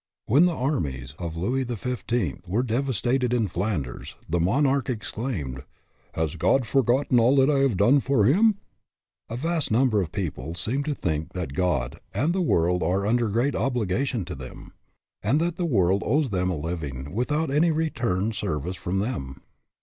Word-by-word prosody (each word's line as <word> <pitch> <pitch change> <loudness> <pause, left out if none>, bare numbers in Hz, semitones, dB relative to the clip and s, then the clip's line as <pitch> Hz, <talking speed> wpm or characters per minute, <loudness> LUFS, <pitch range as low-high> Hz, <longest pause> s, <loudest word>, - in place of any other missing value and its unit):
When 145 +10 +5
the 175 - -1
armies 70 - -2
of 85 -2 -5
Louis 125 +10 0
XIV. 120 -5 -3
were 110 +7 +1
devas 130 -1 -1
tated 125 0 +1
in 115 -4 +2
Flanders, 85 - -3
the 85 +2 0
monarch 135 - +2
exclaimed: 105 - -3 0.3
" - - -38
Has 80 -2 -1
God 135 -2 +2
forgotten 130 0 +2
all 120 +4 +4
that 135 +1 +4
I 140 - +2
have 135 -8 +2
done 125 +9 +5
for 135 -6 +2
him? 205 - +4 0.4
" - - -54
A 115 - -4
vast 165 +2 0
number 110 -2 +3
of 85 -3 -4
people 85 -5 -4
seem 130 +10 -1
to 150 -1 -1
think 80 - -2
that 90 -7 -4
God 80 -8 -1 0.2
and 145 - +1
the 190 - 0
world 90 - +2
are 95 +4 +1
under 120 +2 +2
great 120 +7 +1
obli 125 -4 0
gations 120 -3 -1
to 90 - -6
them, 65 -3 -10 0.5
and 120 +9 +2
that 170 +1 -1
the 175 - 0
world 100 - +2
owes 145 -4 +1
them 90 -1 0
a 90 - -1
living 75 -3 -5
without 145 +7 0
any 155 +4 +3
return 120 - 0
service 90 -3 -3
from 90 +2 -2
them. 70 - -3
115 Hz, 180 wpm, -25 LUFS, 90-135 Hz, 0.5 s, When